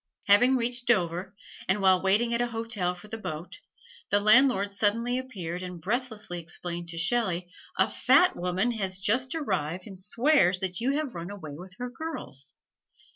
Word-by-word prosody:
Having 245 +6 +5
reached 240 0 -2
Dover, 185 -3 +1 0.3
and 190 +2 +2
while 190 -2 +4
waiting 215 +5 +2
at 235 - +1
a 240 - +1
hotel 225 -6 -2
for 180 +4 -13
the 225 +1 -6
boat, 160 -3 -6 0.5
the 205 - +3
landlord 215 -1 +4
suddenly 230 +5 +1
appeared 185 -9 -5
and 180 -1 -7
breathlessly 210 -2 -3
explained 170 0 -6
to 165 - -5
Shelley, 180 -1 +1 0.3
"A - - +4
fat 365 - +4
woman 180 +6 0
has 195 -5 -2
just 250 +8 +1
arrived 185 - -2
and 195 -3 -10
swears 210 - +3
that 185 -1 -2
you 265 +4 +1
have 295 -3 -2
run 170 +1 -6
away 185 -8 -8
with 180 +4 -11
her 250 0 -5
girls!" 145 - -6
200 Hz, 170 wpm, -28 LUFS, 180-240 Hz, 0.5 s, Having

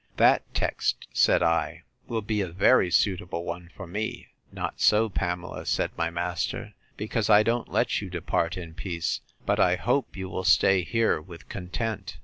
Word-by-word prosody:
That - - +5
text, - - -1
said - - +4
I, 85 -1 0 0.2
will 115 -2 -2
be 105 0 -1
a 95 - -1
very 95 +3 +4
suitable 90 -1 +1
one 85 0 -6
for 95 - -7
me. 105 +5 -4 0.2
Not - - -5
so, 110 +1 +4
Pamela, 90 -1 -3
said - - 0
my 85 0 0
master; 85 0 -3 0.2
because 110 0 -1
I 105 0 +7
don't 115 +1 0
let - - +1
you 100 - -6
depart 85 0 -1
in 85 -3 -7
peace; 85 -2 -3 0.2
but - - +1
I 90 0 +4
hope 125 +4 -1
you 95 0 -4
will 95 0 -4
stay 95 0 +5
here 115 -4 +1
with 85 +1 -13
content. 95 0 -4
95 Hz, 170 wpm, -27 LUFS, 85-105 Hz, 0.2 s, I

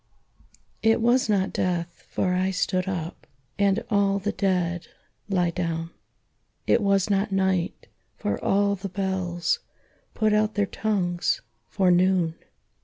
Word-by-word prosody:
XXXV. - - -34 0.2
It 225 +1 +4
was 240 0 +3
not 195 -2 +1
death, 175 -2 -2
for 180 -1 0
I 185 +1 +1
stood 185 0 0
up, 175 -2 -5 0.3
And 200 +2 +2
all 200 -1 +3
the 200 +1 -1
dead 180 -3 0 0.4
lie 180 -3 +2
down; 165 -1 -3 0.7
It - - +3
was 200 0 +2
not 200 +1 +1
night, 190 -2 0 0.3
for 100 - -3
all 200 0 +2
the 195 +1 -6
bells 185 -3 -1 0.6
Put 215 -1 +2
out 215 0 +2
their 205 -1 +2
tongues, 185 -5 -1 0.3
for 190 -2 +2
noon. 180 -2 +3
190 Hz, 135 wpm, -25 LUFS, 175-200 Hz, 0.7 s, It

